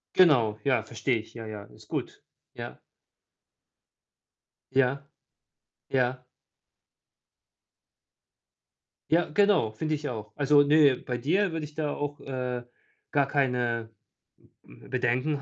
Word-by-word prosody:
Genau, 120 - +5
ja, 125 -6 +2
verstehe 115 +1 -1
ich. 110 +1 -12
Ja, 115 -1 -7
ja, 105 -2 -7
ist - - -18
gut. - - -5 0.3
Ja. - - -8 1.9
Ja. 135 +1 +2 0.8
Ja. 130 -1 0 2.9
Ja, 170 +1 +4
genau, 195 - +3
finde 155 +7 -2
ich 145 0 -5
auch. 110 -3 -6
Also, 145 0 +5
ne, 145 -2 +5
bei 125 0 -4
dir 180 +9 +1
würde 160 -2 -3
ich 150 - -12
da 150 -2 -2
auch, 145 0 -4
äh, 125 -2 -3 0.5
gar 140 -2 +3
keine 125 -5 0 0.5
m-m - - -19
Bedenken 130 +4 0
135 Hz, 115 wpm, -28 LUFS, 120-150 Hz, 2.9 s, Genau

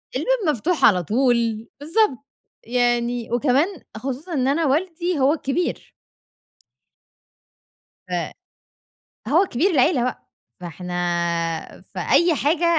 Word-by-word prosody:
الباب - - +1 0.2
مفتوح 325 +9 +1
على 180 -4 +4
طول، 230 - +1
بالضبط 305 - +1 0.4
يعني 240 0 0
وكمان 260 +5 +2 0.3
خصوصًا 270 +8 -5
إن 260 -4 +1
أنا 305 +4 +1
والدي 340 +3 0
هو 270 +2 +4
الكبير. 330 +2 -2 2.2
ف - - -12 1.2
هو 330 - +4
كبير 345 +3 +1
العيلة 270 -3 +3
بقى، 250 - -4 0.3
فإحنا 180 +1 -7 0.9
فأي 340 -1 +2
حاجة 310 +4 +1
270 Hz, 100 wpm, -22 LUFS, 240-330 Hz, 2.2 s, على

